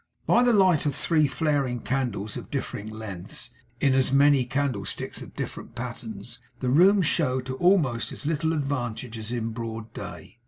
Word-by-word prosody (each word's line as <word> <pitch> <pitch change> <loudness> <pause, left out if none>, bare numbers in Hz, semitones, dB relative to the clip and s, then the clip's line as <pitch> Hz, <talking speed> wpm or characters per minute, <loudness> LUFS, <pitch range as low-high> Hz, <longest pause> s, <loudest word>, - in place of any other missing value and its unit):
By 240 - +5
the 245 0 +4
light 185 -8 +4
of 140 - -1
three 155 -3 +3
flaring 140 -3 0
candles 120 -6 -2
of - - -7
different 110 +2 -4
lengths, 110 +2 -6 0.3
in 135 -1 +3
as 130 0 +3
many 140 -1 +5
candlesticks 140 +1 -2
of - - -11
different - - -6
patterns, 125 - -7 0.2
the 125 - -1
room 185 +8 +6
showed 130 -6 +1
to 130 0 -4
almost 160 -10 +3
as - - -8
little 160 +1 +1
advantage 130 -6 -2
as 110 +1 -5
in 115 -2 -2
broad 115 -1 -6
day. 120 - -9
130 Hz, 165 wpm, -26 LUFS, 120-150 Hz, 0.3 s, room